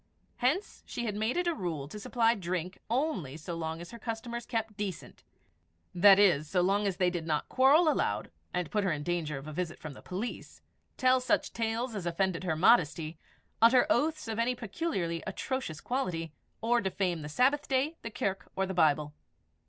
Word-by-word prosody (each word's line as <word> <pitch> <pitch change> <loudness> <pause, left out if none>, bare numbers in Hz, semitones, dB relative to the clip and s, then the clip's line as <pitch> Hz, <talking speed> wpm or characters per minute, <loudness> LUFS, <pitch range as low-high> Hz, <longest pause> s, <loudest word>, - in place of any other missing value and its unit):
Hence 285 +11 0
she 240 - -4
had 215 - -1
made 220 - -1
it 355 - +1
a 345 - +2
rule 165 - -4
to 210 - -8
supply 230 +2 +2
drink 180 -3 -4
only 225 - -1
so 165 +2 -6
long 160 -1 -3
as 170 +1 -9
her 235 - -9
customers 235 +1 -5
kept 225 -2 -2
decent 195 -6 -6 0.7
that 195 +2 +7
is, 175 -7 +4
so 185 -2 +2
long 200 +3 +2
as 190 -2 -2
they 180 -1 +2
did 170 -2 -4
not 150 -2 0
quarrel 280 +6 +5
aloud, 305 - 0 0.2
and 180 -3 -2
put 210 -1 +1
her 190 - +1
in 150 -2 -2
danger 160 -3 -2
of 135 +2 -8
a 155 - -6
visit 170 +1 -3
from 155 -2 -8
the - - -13
police; 195 +6 -6 0.4
tell 255 0 +4
such 250 - +1
tales 230 +2 -1
as 195 -5 -4
offended 180 +1 0
her 160 -3 0
modesty; 165 -3 +3 0.4
utter 245 +2 +7
oaths 310 -3 +1
of 225 0 -3
any 245 +2 +1
peculiarly 195 - -2
atrocious 195 - -3
quality; 170 - -2 0.3
or 235 +1 +2
defame 185 -3 -1
the 150 - -6
Sabbath 270 - +2
Day, 275 +4 +1
the 230 - -5
Kirk, 195 -3 -3
or 195 - +1
the 190 - -4
Bible. 150 -3 +2
195 Hz, 190 wpm, -30 LUFS, 170-240 Hz, 0.7 s, that